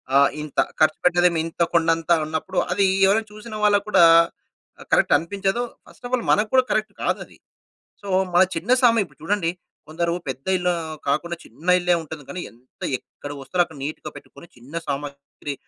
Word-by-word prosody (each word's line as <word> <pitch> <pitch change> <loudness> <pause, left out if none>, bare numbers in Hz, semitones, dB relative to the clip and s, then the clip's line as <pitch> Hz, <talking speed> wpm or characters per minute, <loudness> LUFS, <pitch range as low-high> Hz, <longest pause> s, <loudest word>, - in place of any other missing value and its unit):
ఆహ్, 140 0 +6
ఇంత 150 -2 -4 0.2
ఖర్చుపెట్టేదేమో 175 +2 +3
ఇంత 165 +1 -6
కొండంత, 165 0 +1
అన్నప్పుడు 160 +4 -4
అది 200 - +2 0.2
ఎవరైనా 215 +3 +2
చూసిన 215 +1 -9
వాళ్ళకి 205 -1 +3
కూడా 175 - +5 0.9
కరెక్ట్ - - +4
అనిపించదు. 195 +7 -2 0.2
ఫస్ట్ - - -15
ఆఫ్ 245 - -10
ఆల్ 235 - -6
మనకు 210 +1 +2
కూడా 260 -1 +6
కరెక్ట్ 215 -1 0
కాదది. - - -3 0.7
సో 200 - -9 0.3
మన 175 - +7
చిన్న 175 +8 -4
సామా 230 -2 +5
ఇప్పుడు - - -20
చూడండి. 175 -1 0 0.4
కొందరు 170 +2 -1 0.2
పెద్ద 130 0 -6
ఇల్లు 180 0 +1 0.4
కాకుండా 170 +4 0
చిన్న 150 +10 -13
ఇల్లే 175 0 +2
ఉంటుంది. 155 -1 -9
కానీ 180 - -5
ఎంత 120 +2 -23 0.2
ఎక్కడ 145 - -11
వస్తువాలక్కడ 170 +3 -1
నీట్‌గా 155 +1 -6
పెట్టుకొని, - - -13
చిన్న 125 +6 -15
సామాగ్రి 140 0 -5
170 Hz, 155 wpm, -22 LUFS, 155-200 Hz, 0.9 s, మన